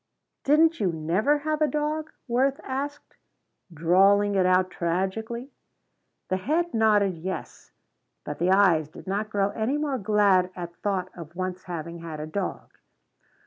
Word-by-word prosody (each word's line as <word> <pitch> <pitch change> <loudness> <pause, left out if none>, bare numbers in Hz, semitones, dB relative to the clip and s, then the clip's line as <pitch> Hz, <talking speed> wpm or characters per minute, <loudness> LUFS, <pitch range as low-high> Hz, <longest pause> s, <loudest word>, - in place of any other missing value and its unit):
"Didn't 320 +3 +4
you 190 -5 +1
never 175 - +1
have 305 +1 -2
a 305 - +4
dog?" 305 +1 -2 0.2
Worth 265 +3 +1
asked, 280 +2 -5 0.5
drawling 195 +5 +4
it 190 -2 +3
out 185 0 +3
tragically. 220 +9 -2 0.8
The 185 - +1
head 320 - -1
nodded 210 -5 +3
yes, 185 +3 -6 0.5
but 150 - -6
the 175 +2 +2
eyes 185 -6 +4
did 155 - -13
not 200 +3 -2
grow 200 -2 +1
any 235 +6 -1
more 290 -3 -1
glad 200 -3 +3
at 175 -1 -7
thought 190 -3 -2
of 170 -1 -10
once 185 0 -4
having 170 -1 -6
had 165 -2 -7
a 150 - -4
dog. 185 +4 -4
200 Hz, 145 wpm, -26 LUFS, 180-260 Hz, 0.8 s, Didn't